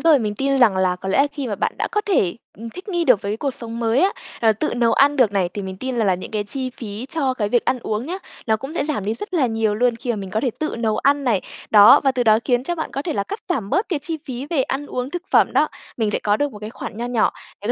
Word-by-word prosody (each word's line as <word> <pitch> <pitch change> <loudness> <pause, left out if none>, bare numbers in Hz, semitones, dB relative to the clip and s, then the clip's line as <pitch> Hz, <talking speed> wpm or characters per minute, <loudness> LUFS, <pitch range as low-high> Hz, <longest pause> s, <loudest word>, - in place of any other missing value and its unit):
rồi. 315 -1 +5
Mình 210 -4 -2
tin 275 +3 +1
rằng 225 -7 +5
là 185 -1 +2
có 190 - -6
lẽ 190 - +1
là 280 - +5
khi 285 -3 -4
mà 215 - -2
bạn - - -1
đã - - -1
có 420 - +2
thể, 345 - +1 0.2
ừm, 230 +1 -7
thích 365 - -10
nghi 345 -3 0
được 250 -9 +4
với 200 - -2
cái 215 - -2
cuộc 280 +3 -1
sống 230 -1 -7
mới 230 +3 +2
á, 385 +2 +4 0.3
là 225 -1 +5
tự 240 +6 -2
nấu 235 -1 +2
ăn 285 +1 +4
được 245 -7 +4
này, 190 -3 +1
thì 205 - -3
mình 190 0 -6
tin 255 +5 -4
rằng 225 -3 +1
là 190 - +3
những 180 - -7
cái 210 -1 -2
chi 255 +5 -4
phí 225 -1 -7
cho 275 -5 -1
cái 210 -4 -1
việc 240 +1 +2
ăn 255 0 +1
uống 220 +1 -3
nhá, 360 +4 -4 0.3
nó 220 -1 +3
cũng 270 +8 -8
sẽ 285 - 0
giảm 295 -10 -2
đi 215 +2 -1
rất 370 - -5
là 290 -6 +3
nhiều 225 -2 0
luôn 240 +1 +2
khi 240 +1 -4
mà 230 - 0
mình 195 -2 -6
có 215 - 0
thể 250 - 0
tự 310 -5 -2
nấu 220 -2 0
ăn 280 0 +2
này. 220 -6 +2 0.3
Đó, 210 -1 +8
và 270 -2 +2
từ 250 - 0
đó 220 -2 +5
khiến 245 -2 +2
cho 345 - -1
bạn 320 - -4
có 275 - -3
thể 320 0 -2
là 200 - 0
cắt 410 - -6
giảm 225 - -2
bớt 395 - +1
cái 330 -6 0
chi 320 +3 -5
phí 260 +1 -5
về 295 -6 +2
ăn 280 +2 -3
uống, 250 +2 -4
thực 355 0 -4
phẩm - - +4
đó. - - +3 0.3
Mình 220 -3 0
sẽ - - 0
có 205 0 +1
được 290 +1 -1
một 210 - -9
cái 210 +1 -7
khoản 225 - -7
nho 235 +2 -3
nhỏ 245 -3 +2 0.3
để - - -5
245 Hz, 320 wpm, -21 LUFS, 215-280 Hz, 0.3 s, Đó